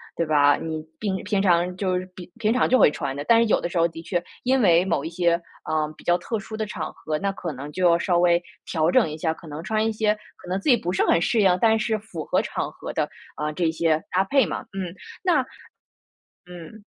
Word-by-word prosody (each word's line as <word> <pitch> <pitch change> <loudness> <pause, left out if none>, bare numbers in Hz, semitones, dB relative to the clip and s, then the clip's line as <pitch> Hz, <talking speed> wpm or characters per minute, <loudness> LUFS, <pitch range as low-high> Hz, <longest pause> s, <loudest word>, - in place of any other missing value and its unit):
对 170 - 0
吧？ 145 -2 +4
你 160 -1 -4 0.2
平 195 -3 -2
平 205 -2 +1
常 180 -1 +2
就 185 -1 0
是 185 - -7
平 180 -1 -11
平 220 0 +2
常 255 - +2
就 255 - +4
会 - - +7
穿 140 -3 -3
的， 145 - -5
但 230 0 +5
是 - - +4
有 - - +4
的 - - -2
时 175 - -4
候 165 - +4
的 165 0 -9
确， 175 0 -2 0.2
因 260 +1 +2
为 175 -2 +5
某 145 -6 0
一 160 - -4
些， 170 0 +2 0.3
啊， 155 -1 0
比 - - -15
较 175 0 +3
特 225 +2 -3
殊 215 +2 -8
的 215 0 -2
场 170 -6 -5
合， 155 -1 -3
那 200 - -1
可 170 -4 -5
能 140 +2 -7
就 180 -2 +3
要 170 - +3
稍 175 -2 +1
微 175 0 +4 0.2
调 160 0 +1
整 165 - +3
一 155 - -6
下， 160 0 0
可 160 - -14
能 150 +2 -6
穿 220 0 0
一 225 - +1
些 215 0 +1 0.2
可 - - -15
能 185 +1 -1
自 295 - -1
己 245 - +6
不 180 -3 -3
是 - - +2
很 170 - +3
适 220 +4 +2
应， 185 -2 +4
但 225 -1 +4
是 215 0 -1
符 190 -7 -7
合 - - +1
场 - - -4
合 - - -8
的， - - -1 0.3
啊， 150 0 -2
这 165 +1 0
些 160 -1 +1
搭 185 +1 +3
配 270 +7 +3
嘛， - - -4
嗯， 190 -2 -5 0.3
那 360 -2 +3 1.1
嗯。 180 +5 -11
180 Hz, 270 characters per minute, -24 LUFS, 165-210 Hz, 1.1 s, 会